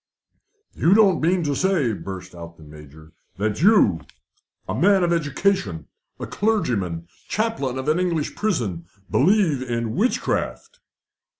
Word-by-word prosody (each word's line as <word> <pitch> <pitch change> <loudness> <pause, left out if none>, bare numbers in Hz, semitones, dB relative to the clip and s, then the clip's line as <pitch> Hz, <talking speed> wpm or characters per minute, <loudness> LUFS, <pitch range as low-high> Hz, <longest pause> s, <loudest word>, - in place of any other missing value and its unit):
"You 175 +5 +3
don't 200 -6 +4
mean 175 +2 +2
to 145 -2 -1
say," 170 - +1
burst 95 -2 -8
out 85 -1 -10
the 80 - -15
Major, 75 +1 -14 0.3
"that 105 +4 -2
you, 180 - +4 0.7
a 95 - -2
man 190 - +3
of 170 0 +2
education, 145 - -1 0.3
a - - -4
clergyman, 100 - -1 0.2
chaplain 215 - -2
of 130 +2 -5
an 155 +3 +2
English 170 -5 -1
prison, 115 - -2 0.3
believe 170 -4 +3
in 115 -3 -3
witchcraft?" 255 - -2
140 Hz, 130 wpm, -22 LUFS, -, 0.7 s, don't